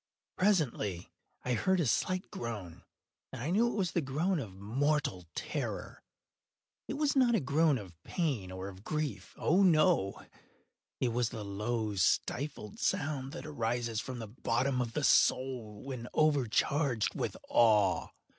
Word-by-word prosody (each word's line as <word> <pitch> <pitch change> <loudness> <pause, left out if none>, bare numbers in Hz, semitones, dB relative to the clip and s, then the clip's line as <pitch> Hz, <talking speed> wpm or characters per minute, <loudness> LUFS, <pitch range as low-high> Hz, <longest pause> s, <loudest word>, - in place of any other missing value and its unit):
Presently 145 - +1 0.3
I 125 - +1
heard 185 +10 +2
a 165 - +2
slight 185 +9 0
groan, 105 -8 -6 0.5
and 130 - -7
I 145 +8 -2
knew 225 +6 +4
it 240 - -2
was 185 -5 0
the 170 - +1
groan 155 +7 0
of 100 -8 -7
mortal 115 - -1
terror. - - -4 0.9
It - - -3
was 290 0 +1
not 250 -3 +4
a - - +3
groan 150 +1 +3
of 95 -6 -9
pain 135 - -2
or 95 +1 -5
of 95 0 -10
grief—oh, 155 - 0
no!—it 155 - 0
was 120 0 0
the 110 -2 -6
low 105 +2 -2
stifled 105 - 0
sound 140 -2 -1
that 170 - -7
arises 115 -5 -1
from 130 0 -6
the 115 -2 -6
bottom 125 +3 0
of 115 -2 -3
the 150 - -1
soul 125 -7 +2
when 130 -3 -6
overcharged 140 -3 +2
with - - -3
awe. 105 -5 +4
130 Hz, 145 wpm, -32 LUFS, 110-155 Hz, 0.9 s, knew